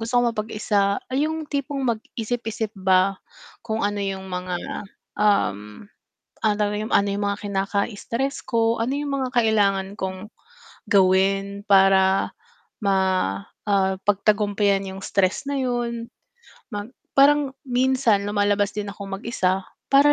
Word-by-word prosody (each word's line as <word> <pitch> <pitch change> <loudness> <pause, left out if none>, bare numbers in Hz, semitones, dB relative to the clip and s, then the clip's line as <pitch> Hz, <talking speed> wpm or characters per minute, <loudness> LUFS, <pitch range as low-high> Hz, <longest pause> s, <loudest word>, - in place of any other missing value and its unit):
gusto 225 +2 -4
kong 240 -1 +1
mapag-isa. 210 -2 0
Ay, 290 +4 +1
yung 315 0 -3
tipong 280 -1 -2
magisip-isip 225 -1 -3
ba 190 0 +3 0.5
kung 220 -1 -2
ano 205 0 -1
yung 190 -1 -4
mga, 180 0 -3 0.6
um, 105 - +1 0.6
ano 215 -1 +3
daw 210 -1 +1
yung 215 +1 -4
ano 200 0 +4
yung 205 +1 -2
mga 200 0 -2
kinaka-stress 205 +6 -2
ko. 230 -1 +1
Ano 245 +4 0
yung 290 0 -3
mga 260 -2 -1
kailangan 200 -4 +2
kong 190 +2 -4 0.6
gawin 195 +1 +3
para 195 -1 +4 0.5
ma 200 -1 +3 0.7
ah, 190 -2 +2
pagtagumpyan 205 -1 +2
yung 190 - -8
stress 195 +7 0
na 285 - -1
yun. 240 -2 -2 0.6
Mag 205 +3 -5 0.3
parang 280 0 +5
minsan 250 -5 +2
lumalabas 205 0 +1
din 205 -1 -3
akong 200 -1 -8
mag-isa 195 -4 0 0.3
para 280 +1 +6
205 Hz, 130 wpm, -23 LUFS, 195-235 Hz, 0.7 s, para